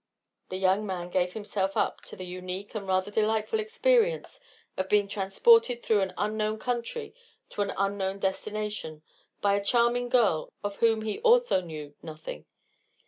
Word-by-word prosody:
The 185 - -3
young 190 +2 +2
man 180 -2 -4
gave 180 0 +1
himself 200 -2 -2
up - - 0
to - - -10
the 185 - -7
unique 185 +3 -6
and 205 -3 -5
rather 185 +2 +1
delightful 220 - +1
experience 480 +2 +1 0.4
of 190 0 -3
being 205 -1 +3
transported 235 - +3
through 215 -3 +3
an 190 -1 -2
unknown 215 +1 -1
country 245 - -3 0.4
to - - -3
an 200 - 0
unknown 195 -1 -1
destination 195 -5 -3 0.4
by 200 -1 +3
a 200 0 +1
charming 240 +2 +2
girl 220 -11 +2
of 205 -1 -3
whom 225 -1 +3
he 220 - -3
also 480 - +4
knew 155 -4 -8
nothing. 155 - -8
205 Hz, 155 wpm, -28 LUFS, 190-235 Hz, 0.4 s, also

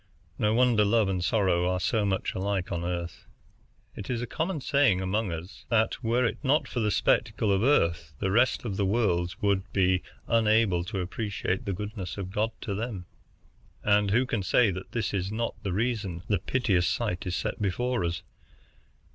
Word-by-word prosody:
No 105 +1 +2
wonder 120 -3 +4
love 105 0 +3
and 90 -2 -1
sorrow 90 -4 +2
are 90 0 0
so 105 +4 +1
much 95 -1 -1
alike 95 -1 -2
on 85 0 -2
Earth. 85 -1 -4 0.7
It 100 - -8
is 125 -2 -1
a 120 - -2
common 160 +6 -2
saying 140 -8 +3
among 95 +1 -1
us 85 +4 -8
that, 115 +2 +1
were 120 +2 +2
it 115 - -1
not 145 +2 +2
for 125 - -3
the 105 -2 +1
spectacle 105 +2 +1
of 95 0 +2
the 120 - +3
Earth, 85 - +1
the 95 - -1
rest 120 +4 +2
of 100 -4 -3
the 100 - +1
worlds 90 -5 0
would 100 -1 +1
be 95 -1 +2 0.2
unable 110 -5 +3
to 100 -1 -3
appreciate 95 0 -3
the 100 - -1
goodness 105 -2 -5
of 95 -2 -5
God 105 +3 0
to 100 - -3
them; 105 -3 -4 0.8
and 105 0 +3
who 120 +6 +3
can 115 -5 -1
say 105 +3 +3
that 95 +1 -7
this 120 -3 -2
is 95 0 -1
not 115 +1 -2
the 100 -3 -3
reason 100 -4 -2
the 105 - +1
piteous 100 -9 +1
sight 90 +1 -2
is 90 - -1
set - - -3
before 120 +3 0
us?" 85 +1 -2
100 Hz, 190 wpm, -28 LUFS, 90-115 Hz, 0.8 s, wonder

